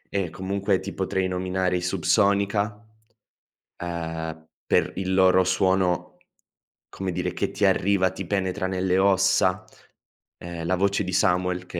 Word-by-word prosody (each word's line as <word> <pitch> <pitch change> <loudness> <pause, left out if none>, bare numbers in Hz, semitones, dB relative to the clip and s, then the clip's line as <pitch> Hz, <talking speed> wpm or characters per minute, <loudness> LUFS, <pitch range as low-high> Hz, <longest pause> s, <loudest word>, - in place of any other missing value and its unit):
E 95 -4 0
comunque 95 +2 -1
ti 100 +1 -7
potrei 95 0 -1
nominare 90 0 -1
i - - -3
Subsonica, 100 +3 +1 1.0
uhm, 80 -2 -5 0.2
per - - +1
il 95 0 -3
loro 95 0 +5
suono, 95 -1 0 0.7
come 95 -1 -4
dire, 85 - -2
che - - -2
ti - - -2
arriva, 95 -1 +3
ti 95 - -6
penetra 95 -1 -1
nelle 95 0 0
ossa. 95 -1 +3 0.7
Ehm, 85 -1 -7
la 90 +2 +1
voce 100 +2 +1
di 90 -1 -5
Samuel, 90 0 +1
che 90 - -7
95 Hz, 135 wpm, -24 LUFS, 90-95 Hz, 1.0 s, loro